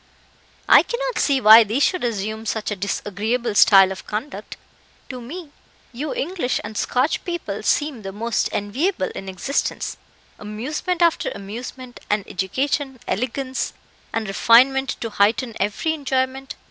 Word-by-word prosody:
"I - - +8
cannot - - -3
see 275 -2 +2
why 220 0 +9
they 220 +5 -1
should 365 +3 +1
assume 220 -1 -3
such 220 0 -2
a - - -1
disagreeable 210 +4 -2
style 195 -2 +7
of 190 - -8
conduct. 215 +7 -6 0.5
To 255 -2 -7
me, 305 +5 -8 0.4
you 285 +5 -4
English 330 -5 -2
and 215 - -7
Scotch 255 +7 0
people 340 - -4
seem 290 +2 0
the 195 -1 -6
most 225 +3 -1
enviable 215 - -1
in 195 - -7
existence 190 +10 -2 0.4
amusement 295 - -2
after 335 -1 +2
amusement, 240 +5 -8
and 205 -1 0
education, 265 - -2
elegance, 260 +4 -2 0.4
and 225 -1 -2
refinement 255 +6 +4
to 230 - -4
heighten 225 +4 +1
every 210 +11 0
enjoyment. 265 -2 -2
240 Hz, 135 wpm, -22 LUFS, 210-275 Hz, 0.5 s, why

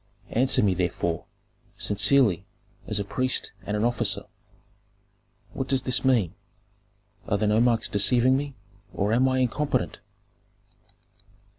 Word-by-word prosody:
"Answer 130 0 +2
me, 100 -3 +3
therefore, 85 -2 -2 0.5
sincerely, 105 -1 +3 0.4
as 105 - -2
a - - -1
priest 130 +5 -1
and 105 +1 -3
an 105 - -1
officer: 120 0 +1 1.3
What 135 -1 -4
does 135 -1 +1
this 125 -2 +2
mean? 120 -10 +2 0.9
Are 100 - +1
the 105 - -1
nomarchs 115 +1 +2
deceiving 120 +5 +3
me, 140 0 -3 0.4
or 105 +2 0
am 130 +3 +3
I 130 - 0
incompetent?" 130 - -1
115 Hz, 120 wpm, -25 LUFS, 105-130 Hz, 1.3 s, me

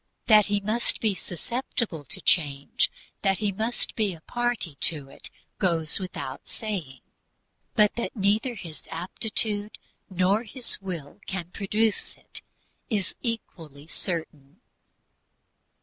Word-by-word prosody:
That 215 -2 +7
he 205 0 +2
must 215 +4 +1
be 215 -3 +3
susceptible 195 - -3
to - - 0
that - - -16
change, 140 -5 +3 0.3
that 195 -2 +3
he 210 -2 +1
must 220 +5 -1
be 205 -5 +1
a 160 - -16
party 240 -6 -1
to 145 -4 +2
it, - - -9 0.3
goes 165 -3 +2
without 160 -8 -5
saying; 175 - -4 0.7
but 210 -1 +6
that 235 - -2
neither 215 +4 +2
his 165 -6 -8
aptitude 205 +4 0 0.3
nor 190 +3 +3
his 240 -1 -2
will 175 -3 -6
can 180 -3 -3
produce 215 +2 0
it, - - -11 0.5
is 205 -5 0
equally 165 - -5
certain. 160 - -5
195 Hz, 125 wpm, -27 LUFS, 165-215 Hz, 0.7 s, That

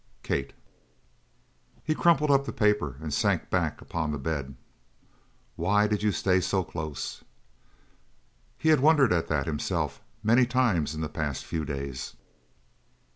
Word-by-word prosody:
Kate." - - -2 1.3
He 155 - +1
crumpled 155 -2 +3
up 140 0 +3
the - - -2
paper 105 - +1
and 75 -2 -4
sank - - +1
back - - 0
upon 80 -3 -3
the 75 - -2
bed. 70 -2 -3 1.0
"Why 105 +5 +2
did 105 -1 0
you 105 0 +2
stay 95 -1 +2
so 95 +1 0
close?" 75 -4 -6 1.3
He 160 - +1
had 155 -3 +6
wondered 145 - +5
at 85 -2 0
that, 75 -3 0
himself, 75 -2 -2 0.2
many 120 +3 +4
times 110 - +1
in 80 - -4
the 80 - -1
past 75 -2 -4
few 80 -2 -3
days. 70 -2 -5
90 Hz, 140 wpm, -27 LUFS, 75-120 Hz, 1.3 s, had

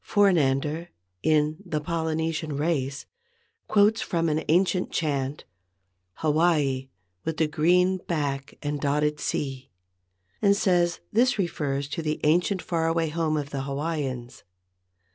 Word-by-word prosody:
For 205 -1 +4
nander, 150 +1 +1 0.3
in 155 0 +2
"The 165 -5 -2
Polynesian 160 -1 -2
Race," 140 -3 -1 0.6
quotes 215 +1 +4
from 165 -3 0
an 155 +1 0
ancient 180 +3 +2
chant, 140 -3 -1 0.7
"Hawaii 150 -4 +1 0.3
with 160 - -3
the 160 - +3
green 180 +5 +3
back 140 -4 -2
and 145 0 -2
dotted 150 +1 +1
sea," 135 -3 -3 0.7
and 200 -1 +5
says 175 -3 +2
this 245 +3 +3
refers 145 -7 -1
to 160 - -3
the 155 -1 -2
ancient 175 +5 +2
far 165 -2 0
away 165 -1 +1
home 155 -1 0
of 145 -1 -4
the 140 - -2
Hawaiians. 135 -3 -4
155 Hz, 125 wpm, -26 LUFS, 145-170 Hz, 0.7 s, and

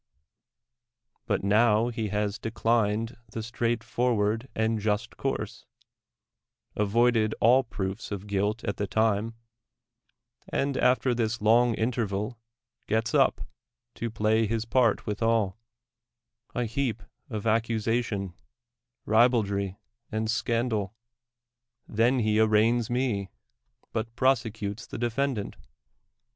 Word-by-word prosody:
iVat - - +1
now 110 +3 +4
he 115 -2 -3
has 105 0 -1
declined 115 0 0 0.2
the 110 - -4
straight 115 0 -1
forward 115 -1 0
and 110 0 +1
just 105 0 -1
course, - - -4 1.1
avoided 110 +1 +2
all 125 +4 +5
proofs 100 -2 -5
of 100 -1 -4
guilt 105 +2 -1
at 100 - -2
the 100 - -2
time, 110 +3 +1 1.1
and 140 0 0
after 125 0 +3
this 115 -1 -1
long 115 +2 +4
interval 110 -1 -2 0.5
gets 110 +1 0
up, 140 -3 +3 0.5
to 115 - -4
play 110 0 +1
his 115 +1 -1
part 115 -2 +2
withal, 110 -2 0 1.0
a 125 - 0
heap 115 -2 -2 0.3
of 110 -4 -4
accu 115 +1 +1
sation, 110 -4 -1 0.7
ribaldry 105 -4 +2 0.3
and 110 0 -1
scandal. 115 -4 -1 0.9
Then 115 +4 +2
he 110 -2 +2
arraigns 110 +2 +3
me. 120 -6 -1 0.6
but 115 +1 -3
prosecutes 115 -6 0
the - - -6
defendant. 120 -1 -1
110 Hz, 105 wpm, -27 LUFS, 105-120 Hz, 1.1 s, all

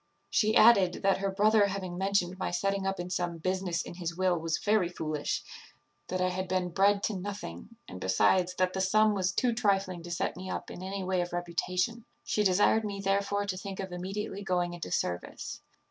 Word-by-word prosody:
She 215 0 +3
added, 200 -6 +6
that 195 0 +3
her 195 0 0
brother 210 +1 +4
having 190 -2 -4
mentioned 190 -1 0
my - - -1
setting 195 +2 -1
up 195 -1 -2
in 175 +1 -5
some 175 -1 -1
business 185 0 -1
in - - -8
his 170 -1 -5
will 185 -1 +2
was 165 0 -1
very 205 -4 +2
foolish; 155 -4 -3 0.6
that 185 - -2
I 185 0 +2
had 185 +1 -3
been 185 -1 0
bred 200 +3 +3
to 215 - 0
nothing; 195 - -7
and, 90 - -9
besides, 180 - +2
that 185 0 +1
the 190 - -1
sum 215 +3 +4
was 190 -2 0
too 240 +4 +1
trifling 195 -6 0
to 175 - -9
set 170 - -2
me 185 +1 -7
up - - -4
in - - -8
any 190 +1 -4
way 185 -1 0
of 175 0 -4
reputation; 180 +6 -1 0.2
she 210 - 0
desired 205 +3 +4
me 200 -2 -4
therefore 200 +1 0
to 195 -2 -3
think 195 0 -6
of 190 -1 -4
immediately 195 +3 -4
going 180 -2 0
into 175 - -6
service. 90 0 -3
185 Hz, 205 wpm, -30 LUFS, 175-200 Hz, 0.6 s, added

